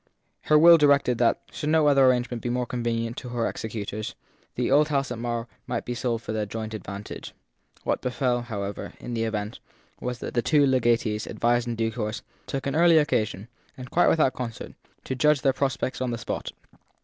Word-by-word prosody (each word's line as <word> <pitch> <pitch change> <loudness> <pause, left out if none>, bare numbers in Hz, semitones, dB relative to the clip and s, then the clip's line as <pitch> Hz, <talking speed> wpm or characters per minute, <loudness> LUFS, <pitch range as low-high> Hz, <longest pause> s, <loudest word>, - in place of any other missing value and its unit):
Her 155 - +5
will 165 +2 +8
directed 140 -5 +3
that, 120 -1 +3
should 150 - -3
no 160 -1 +4
other 140 -2 +5
arrangement 125 -2 +1
be 120 - -3
more 125 +1 0
convenient 115 -1 -2
to 125 - -6
her 120 -1 -1
executors, 110 -1 -5 0.4
the 125 +1 -1
old 150 +2 +5
house 140 -3 -1
at 120 - -4
Marr 120 0 -3 0.2
might - - -3
be 120 - -3
sold 115 -2 -2
for - - -5
their 105 -1 -2
joint 110 +1 -5
advantage. 100 0 -7 0.5
What - - -1
befell, 125 -1 0
however, 100 -4 -5
in 120 - -6
the 115 -1 0
event, 105 -1 -3 0.4
was 125 0 -3
that - - -6
the 120 - +2
two 145 +2 +4
legatees, 120 -5 +1
advised 120 +1 +1
in 120 - -2
due 115 0 0
course, 110 -2 -4 0.2
took 135 - -4
an 140 +1 -1
early 170 0 +6
occasion 110 -8 0 0.3
and 125 -1 -9
quite 175 - +4
without 150 -5 +3
concert 120 -3 -6 0.3
to - - -3
judge 150 +1 +3
their 135 0 +3
prospects 135 -1 -2
on 130 - 0
the 120 - -2
spot. 115 - -4
120 Hz, 195 wpm, -26 LUFS, 115-135 Hz, 0.5 s, will